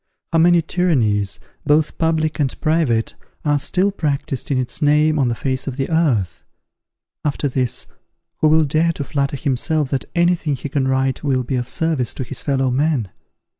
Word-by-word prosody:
How 165 Hz, -, +4 dB
many 170 Hz, 0 st, +5 dB
tyrannies, 115 Hz, -, +1 dB, 0.2 s
both 150 Hz, +1 st, +1 dB
public 160 Hz, -1 st, 0 dB
and 140 Hz, -3 st, -1 dB
private, 155 Hz, -8 st, +1 dB, 0.3 s
are 145 Hz, -1 st, +2 dB
still 185 Hz, +7 st, +1 dB
practised 140 Hz, -, -2 dB
in 140 Hz, -, +1 dB
its 130 Hz, -1 st, 0 dB
name 150 Hz, +1 st, +3 dB
on 135 Hz, -, +2 dB
the 120 Hz, -, 0 dB
face 130 Hz, +3 st, -2 dB
of 135 Hz, -1 st, -4 dB
the 135 Hz, +3 st, -2 dB
earth! 105 Hz, -, +1 dB, 0.8 s
After 145 Hz, -1 st, -1 dB
this, 130 Hz, -2 st, -1 dB, 0.5 s
who 155 Hz, -, +3 dB
will 155 Hz, 0 st, +4 dB
dare 160 Hz, +4 st, +1 dB
to 145 Hz, -, -4 dB
flatter 140 Hz, 0 st, -1 dB
himself 140 Hz, +2 st, -1 dB
that 135 Hz, -, -1 dB
any 175 Hz, +1 st, +4 dB
thing 155 Hz, -4 st, -2 dB
he 140 Hz, -, -6 dB
can 135 Hz, -2 st, 0 dB
write 130 Hz, 0 st, 0 dB
will 130 Hz, -3 st, +1 dB
be 125 Hz, -, -4 dB
of 125 Hz, 0 st, -2 dB
service 160 Hz, -7 st, -1 dB
to 130 Hz, -, -3 dB
his 120 Hz, -, -5 dB
fellow 135 Hz, -2 st, 0 dB
men? 135 Hz, -, 0 dB
145 Hz, 180 wpm, -20 LUFS, 130-155 Hz, 0.8 s, many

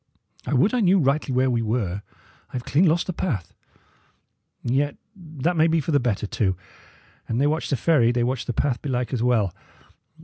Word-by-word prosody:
I 145 Hz, -, 0 dB
would 190 Hz, -, +3 dB
I 250 Hz, -, +2 dB
knew 195 Hz, -2 st, +4 dB
rightly 140 Hz, -3 st, +1 dB
where 130 Hz, +1 st, +2 dB
we 120 Hz, -1 st, +1 dB
were. 105 Hz, -4 st, -1 dB, 0.5 s
I -, -, -27 dB
have 125 Hz, -1 st, -4 dB
clean 160 Hz, +7 st, +3 dB
lost 165 Hz, +2 st, +2 dB
the 185 Hz, -, -3 dB
path; 125 Hz, -, -3 dB, 1.1 s
yet 140 Hz, +4 st, 0 dB, 0.2 s
that 165 Hz, -2 st, -3 dB
may 160 Hz, 0 st, +4 dB
be 165 Hz, 0 st, +2 dB
for 160 Hz, -, -2 dB
the 145 Hz, -, +4 dB
better, 115 Hz, -5 st, -1 dB
too. 95 Hz, -3 st, -1 dB, 0.7 s
An 115 Hz, -, -2 dB
they 140 Hz, -, +2 dB
watch 155 Hz, +2 st, 0 dB
the 140 Hz, -, +1 dB
ferry, 120 Hz, -3 st, +3 dB
they 120 Hz, -1 st, 0 dB
watch 125 Hz, 0 st, -2 dB
the -, -, 0 dB
path, 125 Hz, 0 st, -1 dB
belike, 125 Hz, -3 st, -2 dB
as 120 Hz, -, -1 dB
well. 115 Hz, -7 st, +2 dB
130 Hz, 200 wpm, -24 LUFS, 120-160 Hz, 1.1 s, knew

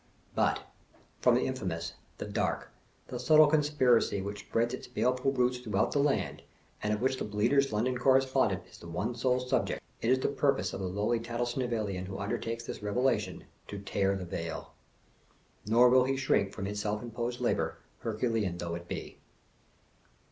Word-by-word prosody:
But, -, -, +2 dB, 0.6 s
from 125 Hz, -1 st, +5 dB
the 125 Hz, -, +2 dB
infamous, 90 Hz, -11 st, -3 dB, 0.2 s
the -, -, -4 dB
dark, -, -, -2 dB, 0.4 s
the 125 Hz, -, -4 dB
subtle 155 Hz, +5 st, +7 dB
conspiracy 145 Hz, -8 st, +3 dB
which 100 Hz, +1 st, -4 dB
spreads 115 Hz, +4 st, 0 dB
its 130 Hz, -, -6 dB
baleful 125 Hz, +2 st, +1 dB
roots 125 Hz, -1 st, +1 dB
throughout 105 Hz, -5 st, 0 dB
the 145 Hz, -, +1 dB
land, 140 Hz, 0 st, +1 dB, 0.4 s
and 105 Hz, -, 0 dB
of 105 Hz, +1 st, -1 dB
which 130 Hz, 0 st, +2 dB
the -, -, -3 dB
Bleater' 105 Hz, +7 st, +2 dB
s 135 Hz, 0 st, +1 dB
London 120 Hz, +4 st, 0 dB
Correspondent 130 Hz, +1 st, +3 dB
is -, -, -15 dB
the 85 Hz, -, -11 dB
one 90 Hz, +8 st, -2 dB
sole 125 Hz, +1 st, +1 dB
subject, 125 Hz, 0 st, 0 dB, 0.2 s
it 115 Hz, -, 0 dB
is 130 Hz, -, +5 dB
the 130 Hz, -, 0 dB
purpose 140 Hz, -1 st, +1 dB
of -, -, -4 dB
the 95 Hz, -, -2 dB
lowly 105 Hz, +5 st, 0 dB
Tattlesnivellian 115 Hz, -5 st, -2 dB
who 95 Hz, -, -5 dB
undertakes 115 Hz, +3 st, -3 dB
this -, -, -6 dB
revelation, 105 Hz, -2 st, 0 dB, 0.2 s
to 100 Hz, -, -6 dB
tear 100 Hz, 0 st, 0 dB
the 95 Hz, -2 st, -4 dB
veil. 85 Hz, -1 st, -5 dB, 0.9 s
Nor 120 Hz, +3 st, +6 dB
will 125 Hz, 0 st, +5 dB
he 135 Hz, +1 st, 0 dB
shrink 100 Hz, -7 st, +2 dB
from 100 Hz, -, -5 dB
his 105 Hz, +1 st, -3 dB
self 105 Hz, +1 st, -2 dB
imposed 120 Hz, +1 st, -3 dB
labor, -, -, 0 dB, 0.2 s
Herculean 110 Hz, -5 st, -1 dB
though 85 Hz, -1 st, -4 dB
it 85 Hz, 0 st, -6 dB
be. -, -, -6 dB
115 Hz, 175 wpm, -31 LUFS, 100-130 Hz, 0.9 s, subtle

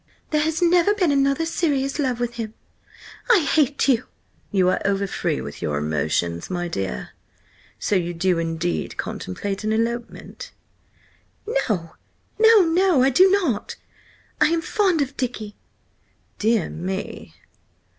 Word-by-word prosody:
"There 305 Hz, -1 st, +2 dB
has 320 Hz, +2 st, 0 dB
never 350 Hz, +4 st, +4 dB
been 360 Hz, -7 st, +2 dB
another 275 Hz, +3 st, +2 dB
serious 290 Hz, -4 st, -1 dB
love 255 Hz, -4 st, 0 dB
with 240 Hz, 0 st, -2 dB
him! 225 Hz, -2 st, -6 dB, 0.7 s
I 445 Hz, -7 st, +6 dB
hate 295 Hz, -2 st, +2 dB
you!" 250 Hz, -5 st, +2 dB, 0.4 s
"You 190 Hz, -3 st, +2 dB
are -, -, 0 dB
overfree 200 Hz, -1 st, -1 dB
with -, -, -8 dB
your 75 Hz, -1 st, -1 dB
emotions, 80 Hz, +3 st, -1 dB
my 175 Hz, -1 st, -2 dB
dear. 95 Hz, -, -4 dB, 0.7 s
So 205 Hz, -, -1 dB
you 175 Hz, -2 st, 0 dB
do 175 Hz, 0 st, +1 dB
indeed 165 Hz, +1 st, -2 dB
contemplate 195 Hz, -, -4 dB
an 215 Hz, -, 0 dB
elopement?" 230 Hz, +2 st, -3 dB, 1.2 s
"No, 165 Hz, -6 st, -2 dB, 0.5 s
no, 445 Hz, -1 st, +7 dB
no! 335 Hz, -4 st, +3 dB
I 270 Hz, -, +4 dB
do 370 Hz, +9 st, +6 dB
not! 355 Hz, -, 0 dB, 0.7 s
I -, -, +7 dB
am 330 Hz, 0 st, +1 dB
fond 365 Hz, -8 st, +2 dB
of 275 Hz, +1 st, -8 dB
Dicky!" 220 Hz, -5 st, -4 dB, 0.8 s
"Dear 220 Hz, -4 st, +1 dB
me!" 190 Hz, +4 st, -5 dB
235 Hz, 135 wpm, -22 LUFS, -, 1.2 s, no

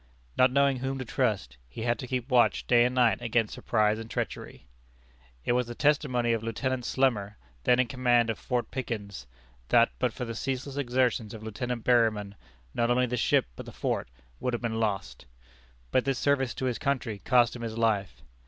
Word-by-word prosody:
Not 130 Hz, 0 st, +4 dB
knowing 140 Hz, 0 st, +3 dB
whom 135 Hz, +1 st, -3 dB
to 130 Hz, -, -5 dB
trust, -, -, -1 dB
he 110 Hz, -, -7 dB
had 120 Hz, 0 st, 0 dB
to 130 Hz, -, -6 dB
keep 125 Hz, -1 st, -2 dB
watch 125 Hz, -1 st, +3 dB
day 120 Hz, -1 st, +5 dB
and 125 Hz, +1 st, -1 dB
night 120 Hz, -2 st, +3 dB
against 115 Hz, -2 st, 0 dB
surprise 110 Hz, -1 st, +1 dB
and 115 Hz, 0 st, -8 dB
treachery. -, -, -5 dB, 0.8 s
It -, -, +1 dB
was 125 Hz, 0 st, +1 dB
the 120 Hz, -, -7 dB
testimony 130 Hz, -5 st, +2 dB
of 115 Hz, -, -1 dB
Lieutenant 125 Hz, +3 st, -2 dB
Slemmer, 115 Hz, -7 st, 0 dB, 0.3 s
then 125 Hz, -, +4 dB
in 125 Hz, -, +4 dB
command 120 Hz, -1 st, +2 dB
of 110 Hz, -, -7 dB
Fort 125 Hz, -3 st, -2 dB
Pickens, 105 Hz, -, -5 dB, 0.4 s
that 115 Hz, 0 st, +5 dB
but 125 Hz, -2 st, +1 dB
for 125 Hz, -, -5 dB
the 115 Hz, -, -5 dB
ceaseless 135 Hz, +3 st, -4 dB
exertions 125 Hz, -5 st, 0 dB
of 110 Hz, -, -10 dB
Lieutenant 115 Hz, +2 st, -4 dB
Berryman 110 Hz, -5 st, +2 dB, 0.4 s
not 120 Hz, 0 st, +1 dB
only 125 Hz, +1 st, +3 dB
the 125 Hz, 0 st, -2 dB
ship 120 Hz, -, +2 dB
but -, -, -9 dB
the -, -, -7 dB
fort -, -, -2 dB, 0.3 s
would 125 Hz, -, -2 dB
have 120 Hz, -, -2 dB
been 115 Hz, -1 st, -1 dB
lost. 95 Hz, -, -3 dB, 0.6 s
But 130 Hz, -, +2 dB
this 135 Hz, -2 st, 0 dB
service 135 Hz, -2 st, +1 dB
to 130 Hz, -, -3 dB
his 125 Hz, -3 st, -1 dB
country 130 Hz, -7 st, -1 dB
cost 120 Hz, +1 st, +3 dB
him 120 Hz, -, -8 dB
his 115 Hz, -1 st, -5 dB
life. 110 Hz, -4 st, 0 dB
120 Hz, 195 wpm, -28 LUFS, 110-130 Hz, 0.8 s, day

